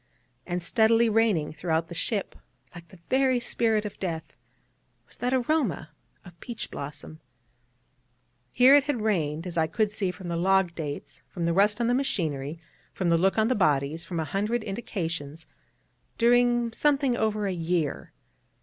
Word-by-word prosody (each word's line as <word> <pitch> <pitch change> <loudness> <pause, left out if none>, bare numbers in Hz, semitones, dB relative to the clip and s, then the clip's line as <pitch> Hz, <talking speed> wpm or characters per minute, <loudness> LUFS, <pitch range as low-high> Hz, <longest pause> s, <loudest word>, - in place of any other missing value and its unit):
And 175 -1 -2
steadily 225 +3 +3
reigning 210 -9 +2
throughout 165 0 -1
the 170 - -8
ship, 200 +4 -2 0.4
like 170 -1 -11
the 185 - -16
very 260 -1 +3
spirit 225 -3 0
of 210 - -7
death, 165 -4 -3 0.8
was - - -13
that 250 - -1
aroma 255 - 0 0.3
of 175 -1 -15
peach 235 -2 -6
blossom. 145 +2 -8 1.3
Here 255 +2 +6
it 285 -1 +6
had 285 -6 -1
reigned, 165 -6 0
as 175 -2 -5
I 160 - +2
could 210 +6 0
see 200 -3 -2
from 180 0 -7
the 170 - -2
log 190 0 +2
dates, 150 -4 -6
from 170 -2 -4
the 170 - +1
rust 205 +4 +3
on 235 - +1
the 240 - +2
machinery, 160 - -2 0.3
from 180 -3 -1
the 170 - +4
look 190 +4 +2
of 220 0 +3
the 255 - +2
bodies, 155 - +1
from 170 -3 -4
a 160 - -1
hundred 210 +8 -1
indications, 165 -8 -5 0.7
during 240 0 +3
something 280 -2 +2
over 215 -2 0
a 195 - -1
year. 165 -3 -2
195 Hz, 165 wpm, -27 LUFS, 165-230 Hz, 1.3 s, Here